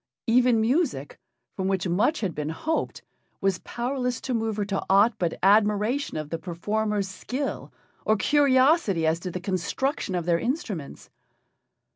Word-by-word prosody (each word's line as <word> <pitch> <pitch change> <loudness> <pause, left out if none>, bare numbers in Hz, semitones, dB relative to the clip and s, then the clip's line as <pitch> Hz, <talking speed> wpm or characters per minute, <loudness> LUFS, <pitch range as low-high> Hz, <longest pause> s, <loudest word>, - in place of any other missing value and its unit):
Even 245 0 +4
music, 235 - 0 0.4
from 190 - -2
which 190 -1 0
much 205 - +1
had 190 -6 -1
been 150 0 -3
hoped, 315 - -3 0.4
was 195 -2 0
powerless 250 0 -3
to 260 - -3
move 225 -2 -1
her 205 - 0
to 195 -1 -2
aught 200 +5 +5
but 170 -2 -1
admiration 210 - +2
of 155 -1 -5
the 165 - -2
performers' 205 +4 -2
skill 255 +8 -5 0.3
or 215 - +3
curiosity 260 - +3
as 160 +1 +1
to 180 - -5
the 180 - -4
construction 190 - -2
of 175 -2 -2
their 170 -1 +2
instruments. 225 - -4
210 Hz, 150 wpm, -26 LUFS, 180-250 Hz, 0.4 s, aught